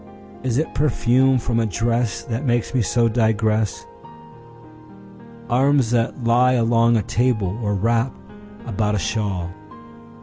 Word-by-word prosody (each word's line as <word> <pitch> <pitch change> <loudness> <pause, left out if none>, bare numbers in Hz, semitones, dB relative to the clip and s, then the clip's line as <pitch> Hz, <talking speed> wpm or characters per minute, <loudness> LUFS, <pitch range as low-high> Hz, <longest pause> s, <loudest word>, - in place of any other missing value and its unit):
Is 125 -1 -1
it 155 - -2
perfume 130 -2 +2
from 115 -1 -1
a 115 - +1
dressThat 115 +2 -2
makes 120 -3 -1
me 130 - +2
so 115 +4 +1
digress? 110 -2 0 1.6
Arms 130 0 +2
that 120 +1 -1
lie 125 +2 +3
along 115 -1 +3
a 105 - 0
table, 105 -5 0
or 105 -2 -1
wrap 115 +5 0 0.5
about 105 -2 -1
a - - 0
shawl. 95 -2 -2
115 Hz, 125 wpm, -21 LUFS, 110-125 Hz, 1.6 s, lie